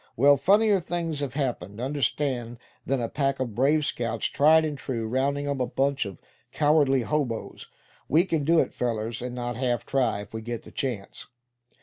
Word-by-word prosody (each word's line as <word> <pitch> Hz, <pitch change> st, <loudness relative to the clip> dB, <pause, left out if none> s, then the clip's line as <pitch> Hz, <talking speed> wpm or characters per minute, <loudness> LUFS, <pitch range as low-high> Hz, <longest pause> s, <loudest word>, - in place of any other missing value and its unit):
Well, 140 Hz, +4 st, +6 dB
funnier 200 Hz, +8 st, +4 dB
things 170 Hz, -3 st, -3 dB
have 140 Hz, -2 st, -4 dB
happened, 115 Hz, -, -3 dB
understand, 130 Hz, -2 st, -1 dB, 0.3 s
than 135 Hz, 0 st, +1 dB
a 115 Hz, -, -1 dB
pack 135 Hz, +1 st, -1 dB
of 125 Hz, -4 st, -2 dB
Brave 145 Hz, +6 st, +2 dB
Scouts, 115 Hz, -4 st, -2 dB
tried 160 Hz, +2 st, +4 dB
and 150 Hz, -2 st, -3 dB
true, 120 Hz, -4 st, -4 dB
rounding 140 Hz, +4 st, 0 dB
up 140 Hz, -1 st, -1 dB
a 125 Hz, -, 0 dB
bunch 135 Hz, -2 st, 0 dB
of 95 Hz, -, -9 dB, 0.3 s
cowardly 145 Hz, -4 st, +3 dB
hoboes. 130 Hz, -5 st, -3 dB, 0.4 s
We 165 Hz, +6 st, +4 dB
can 165 Hz, -5 st, -1 dB
do 165 Hz, +4 st, +3 dB
it, -, -, 0 dB
fellers, 115 Hz, -1 st, -2 dB
and 125 Hz, 0 st, -5 dB
not 120 Hz, -1 st, -4 dB
half 125 Hz, -2 st, -1 dB
try, 130 Hz, -6 st, 0 dB
if 105 Hz, -, -12 dB
we 110 Hz, -, -4 dB
get 120 Hz, +1 st, -5 dB
the -, -, -13 dB
chance." 120 Hz, -8 st, -5 dB
135 Hz, 185 wpm, -26 LUFS, 120-145 Hz, 0.4 s, Well